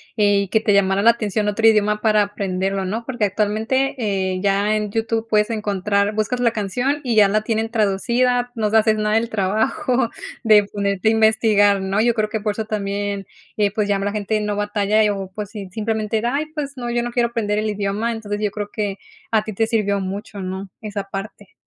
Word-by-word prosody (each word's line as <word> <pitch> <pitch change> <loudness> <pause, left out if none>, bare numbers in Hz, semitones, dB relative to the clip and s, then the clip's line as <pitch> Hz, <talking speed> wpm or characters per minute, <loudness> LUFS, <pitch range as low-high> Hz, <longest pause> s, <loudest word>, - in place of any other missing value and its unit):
eh, 205 -2 +3
y 200 - -6
que 220 +3 +1
te 210 -2 +2
llamara 195 0 +3
la 230 - +6
atención 215 -2 -2
otro 225 +2 +2
idioma 210 -1 +3
para 215 -1 +4
aprenderlo, 195 -1 -2
¿no? 220 +5 -3
Porque 240 -4 -1
actualmente, 220 +7 0
eh, 190 -4 -1
ya 200 +2 +2
en 210 -1 -3
YouTube 225 +1 -1
puedes 210 +1 +2
encontrar 205 -1 0
buscas 215 +3 -1
la 240 -2 +3
canción 245 +7 -1
y 240 -4 0
ya 210 -2 +7
la 210 +2 +1
tienen 220 +1 -1
traducida, 240 +4 +1
no 215 -2 0
se 220 - +4
haces 220 0 +4
nada 210 0 +1
del 225 +1 +1
trabajo 225 +5 0 0.3
de 215 -2 +6
ponerte 200 0 -1
a - - +4
investigar, 220 -2 +3
¿no? 195 +2 -1
Yo 235 +1 +3
creo 215 -2 -1
que 220 - -2
por 210 0 -1
eso 220 +1 -4
también, 200 -1 -3 0.3
eh 205 -1 +2
pues, 210 -2 0
ya 200 - +3
nada 195 - -2
más 205 - -1
la - - -1
gente 215 +2 -1
no 210 -1 -2
batalla, 205 +1 +1
y 210 - +3
o 195 -2 -3
pues 210 -1 -5
si 210 -2 -7
si 185 - -13
simplemente 220 0 -1
de: 235 - -1
“Ay, 280 +5 0
pues 285 -2 -3
no, 240 -1 -4
yo 240 0 0
no 240 - -4
quiero 240 -1 +1
aprender 210 -3 -1
el 215 0 -1
idioma”. 205 +3 -1
Entonces, 205 -2 -4
yo 210 -1 0
creo 205 0 -5
que 205 -3 -3 0.3
a 220 -2 +3
ti 215 - -5
te 225 +3 0
sirvió 205 -3 +1
mucho, 195 +2 -5
¿no?, 190 +1 -5
esa 205 -2 -4
parte. 195 0 -8
210 Hz, 225 wpm, -21 LUFS, 200-225 Hz, 0.3 s, ya